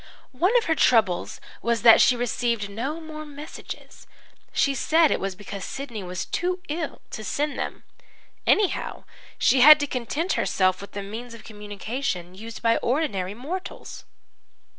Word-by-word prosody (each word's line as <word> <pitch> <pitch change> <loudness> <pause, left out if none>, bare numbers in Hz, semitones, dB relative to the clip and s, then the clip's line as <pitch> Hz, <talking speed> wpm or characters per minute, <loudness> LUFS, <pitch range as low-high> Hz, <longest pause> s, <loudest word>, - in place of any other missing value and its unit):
One 365 - +3
of 475 - +2
her 325 - +2
troubles 220 - +2 0.2
was 235 -1 0
that 230 -2 +9
she 250 - +5
received 235 -3 -1
no 265 +10 -3
more 310 -1 -8
messages; 295 +1 -10 0.4
she 280 - +2
said 315 +4 +3
it - - +1
was 195 -1 -3
because 200 0 -7
Sidney 250 -6 -6
was 180 -1 -4
too 360 +1 -1
ill 310 0 -4
to 220 - -6
send 290 +6 -2
them. - - -4 0.6
Anyhow, 410 -3 +1 0.3
she 260 - +4
had 305 +3 +10
to 290 - 0
content 285 +7 -2
herself 185 -1 +1
with 200 - -10
the 200 - -4
means 230 +4 -7
of 230 - -13
communication 210 -2 -5
used 225 +5 -9
by 230 0 +4
ordinary 210 - -1
mortals. 330 - -7
240 Hz, 155 wpm, -25 LUFS, 205-300 Hz, 0.6 s, had